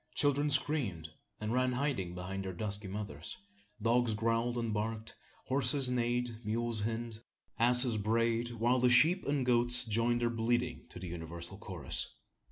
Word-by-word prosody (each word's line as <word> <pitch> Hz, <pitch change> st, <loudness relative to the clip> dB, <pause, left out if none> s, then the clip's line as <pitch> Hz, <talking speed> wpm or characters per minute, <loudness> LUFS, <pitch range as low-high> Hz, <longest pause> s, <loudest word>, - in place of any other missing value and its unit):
Children 145 Hz, 0 st, +2 dB
screamed, 130 Hz, -, +1 dB, 0.3 s
and 110 Hz, +2 st, -3 dB
ran 130 Hz, 0 st, +1 dB
hiding 125 Hz, -10 st, -2 dB
behind 95 Hz, +2 st, -5 dB
their 95 Hz, -1 st, -5 dB
dusky 100 Hz, +2 st, -4 dB
mothers; 95 Hz, -6 st, -4 dB, 0.4 s
dogs 115 Hz, 0 st, +2 dB
growled 115 Hz, +2 st, 0 dB
and 115 Hz, -2 st, -2 dB
barked; 110 Hz, +1 st, -3 dB, 0.3 s
horses 130 Hz, 0 st, +1 dB
neighed; 120 Hz, -1 st, -1 dB
mules 115 Hz, +1 st, -1 dB
hinnied; 115 Hz, +1 st, -3 dB, 0.4 s
asses 125 Hz, 0 st, +6 dB
brayed; 115 Hz, +2 st, 0 dB
while 120 Hz, +2 st, +1 dB
the 125 Hz, 0 st, +4 dB
sheep 160 Hz, +10 st, +5 dB
and 140 Hz, -2 st, 0 dB
goats 120 Hz, 0 st, +4 dB
joined 115 Hz, +2 st, +1 dB
their 120 Hz, -, +1 dB
bleating 120 Hz, +1 st, -1 dB
to -, -, -11 dB
the 90 Hz, +1 st, -7 dB
universal 85 Hz, +2 st, -7 dB
chorus. 85 Hz, -10 st, -2 dB
115 Hz, 150 wpm, -32 LUFS, 105-125 Hz, 0.4 s, asses